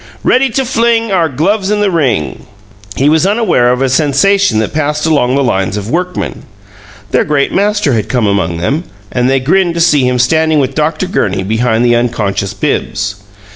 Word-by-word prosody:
Ready 260 +1 +2
to 265 +3 -1
fling 230 -2 +1
Our 170 -4 +1
gloves 190 - -1
in 210 0 0
the 205 -2 +1
ring 125 - -1 0.5
He 135 - +1
was 160 +4 +3
unaware 205 - +2
of 125 +2 0
a - - +2
sensation 150 - +2
that 110 -1 -1
passed 150 0 -1
along 140 -5 +1
the 140 - +1
lines 95 -5 -1
of 105 +2 -5
workmen. 180 +3 -3 0.7
Their - - +2
great 145 -2 0
master 205 -7 +1
had 110 -3 -2
come 125 -4 0
among 95 -5 0
them, 140 - -2 0.3
and 125 +1 0
they 135 0 +2
grinned 170 +6 +1
to - - -2
see 150 -6 +3
him 125 0 0
standing 160 +5 +2
with 135 -1 -1
Dr. 155 +5 -1
Gurney 100 - -1
behind 110 +3 0
the 120 0 +3
unconscious 105 -4 -2
Bibbs. 100 +1 -2
140 Hz, 185 wpm, -12 LUFS, 120-180 Hz, 0.7 s, was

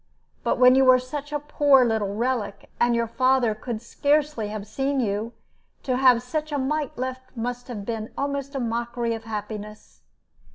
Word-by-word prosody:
But - - +1
when 250 0 +7
you 265 +1 +5
were 255 -1 +7
such 280 +3 -6
a 295 - 0
poor 285 -3 +4
little 215 -3 -1
relic, 230 -3 -2
and 240 0 +3
your 235 0 +1
father 255 -1 +2
could 220 +1 -6
scarcely 290 -3 0
have 210 -1 -5
seen 270 +6 -1
you, 220 0 -1 0.5
to 255 - 0
have 250 -2 +5
such 305 +4 -3
a 290 - 0
mite 285 +1 -2
left 260 0 -5
must 245 +1 -4
have 215 -5 -6
been 220 -1 -4
almost 280 0 -3
a - - -1
mockery 235 0 -2
of 225 0 -7
happiness. 210 -1 -7
245 Hz, 175 wpm, -24 LUFS, 225-270 Hz, 0.5 s, when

